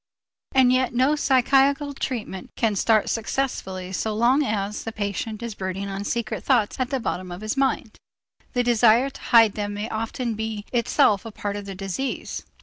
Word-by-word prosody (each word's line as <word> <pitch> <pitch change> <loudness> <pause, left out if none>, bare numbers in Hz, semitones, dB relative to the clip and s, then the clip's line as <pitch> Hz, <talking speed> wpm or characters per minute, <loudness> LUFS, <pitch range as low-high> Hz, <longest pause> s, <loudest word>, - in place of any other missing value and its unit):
And 255 -1 +6
yet 255 -1 +1
no 260 +5 +3
psychical 275 +1 +3
treatment 225 -8 -4
can 220 -3 +1
start 215 +2 +3
successfully 200 -6 -2
so 215 +3 -1
long 245 +6 +4
as 210 -5 -2
the 225 - -4
patient 215 +1 -4
is 235 -2 -4
brooding 195 0 -4
on 195 +1 -4
secret 235 +1 -2
thoughts 240 -5 +1
at 255 -1 0
the 270 - -1
bottom 185 -6 -3
of 175 +3 -7
his 215 +3 -2
mind. 265 -5 0 0.6
The 245 - +2
desire 240 +2 +4
to - - -13
hide 225 -3 +5
them 205 -1 -3
may 210 +2 -4
often 225 +2 -3
be 220 -1 -4
itself 215 -4 +3
a 225 - -7
part 205 -1 -4
of 205 -1 -6
the 195 -1 -7
disease. 195 +8 -4
225 Hz, 180 wpm, -24 LUFS, 205-255 Hz, 0.6 s, And